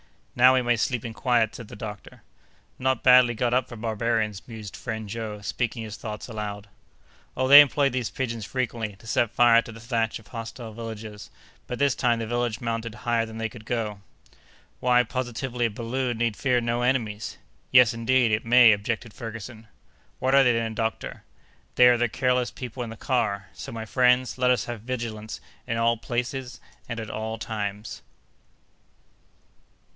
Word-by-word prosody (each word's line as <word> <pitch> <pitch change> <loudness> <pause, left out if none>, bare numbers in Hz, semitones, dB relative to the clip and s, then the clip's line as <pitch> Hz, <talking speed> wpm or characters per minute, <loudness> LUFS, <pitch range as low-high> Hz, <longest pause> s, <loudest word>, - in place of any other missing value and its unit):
"Now 125 +1 +6
we 130 - +2
may 120 0 +2
sleep 120 +1 -1
in 115 - -5
quiet," 120 -2 +1
said 115 - -9
the - - -10
doctor. 105 -1 -9 0.6
"Not 130 -1 0
badly 125 -2 +6
got 120 +2 0
up 130 +1 +1
for 120 - -8
barbarians," 110 -2 -1
mused 110 -4 -8
friend 110 -3 -5
Joe, 105 -1 -5
speaking 115 +3 -2
his 110 -1 -7
thoughts 105 -2 -6
aloud. 105 -3 -6 0.7
"Oh, 130 - +1
they 140 +2 +12
employ 140 0 +2
these 125 -2 -2
pigeons 115 -4 -3
frequently, 115 -3 -3
to 100 - -19
set 120 0 +1
fire 120 0 +5
to 115 - -10
the 115 - -11
thatch 115 -1 -1
of 110 - -17
hostile 115 -1 -7
villages; 110 -2 -8 0.4
but 125 - -4
this 140 0 +3
time 120 -2 +1
the 115 - -3
village 120 0 -2
mounted 115 -1 -3
higher 115 0 0
than 110 0 -9
they 115 0 -2
could 110 -2 -13
go." 110 -4 -3 0.8
"Why, 125 0 +4
positively, 125 0 -3
a - - +1
balloon 120 +3 -3
need 115 -2 0
fear 125 0 +1
no 120 0 -1
enemies!" 115 -4 -1 0.3
"Yes, 125 -3 +6
indeed, 115 +1 +2
it 105 +1 +1
may!" 120 0 +7
objected 110 +2 -2
Ferguson. 115 0 -8 0.5
"What 130 +1 0
are 140 0 +7
they, 125 -2 +4
then, 115 -1 -1
doctor?" 110 0 -3 0.5
"They 125 - +7
are 120 - +4
the 120 0 +1
careless 125 +1 +1
people 125 0 -7
in 120 - -4
the 115 - -9
car! 105 -8 -1
So, - - -8
my 115 -1 -5
friends, 125 +2 +2
let 125 0 +3
us 125 - +2
have 120 -3 -6
vigilance 115 -3 -5 0.3
in 115 - -1
all 115 0 +2
places 125 +2 -4 0.3
and 115 -1 -4
at 110 -1 -6
all 110 +1 -4
times." 105 -1 -5
115 Hz, 180 wpm, -25 LUFS, 110-125 Hz, 0.8 s, they